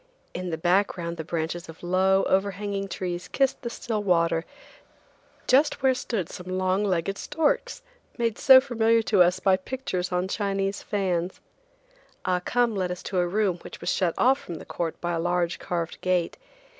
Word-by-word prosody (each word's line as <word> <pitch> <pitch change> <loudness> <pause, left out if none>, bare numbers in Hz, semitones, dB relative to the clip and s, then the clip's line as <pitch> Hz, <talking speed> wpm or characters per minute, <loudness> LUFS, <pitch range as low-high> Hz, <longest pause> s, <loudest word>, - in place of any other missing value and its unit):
In 180 0 -4
the 160 - -2
background 175 -1 0
the 160 - -4
branches 170 +1 -3
of 160 - -12
low, 190 +2 +3
overhanging 195 +1 -1
trees 180 -2 -4
kissed 270 -1 0
the 235 - -4
still 225 -2 -3
water 170 -4 +2 1.0
just 275 +1 +3
where 265 -1 +5
stood 225 -8 -3
some 185 +1 -6
long 185 +2 +1
legged 195 0 -1
storks, - - -1 0.3
made 230 -3 -1
so 265 -1 +9
familiar 230 -3 +2
to 205 -4 +3
us 180 +1 +4
by 190 0 +3
pictures 185 -4 -4
on 180 +1 0
Chinese 195 -1 -1
fans. 185 -3 -2 0.9
Ah 180 -1 +1
Cum 240 +1 +1
led 185 -2 -1
us 180 0 -5
to 185 - -1
a 175 - +2
room 195 -1 +1
which - - -10
was - - -1
shut 175 -3 0
off 265 +3 +4
from 170 - -7
the - - -9
court 165 -2 -4
by 175 - -1
a 165 - -1
large 175 0 0
carved 170 -2 -4
gate. 180 -2 0
185 Hz, 175 wpm, -26 LUFS, 175-215 Hz, 1.0 s, so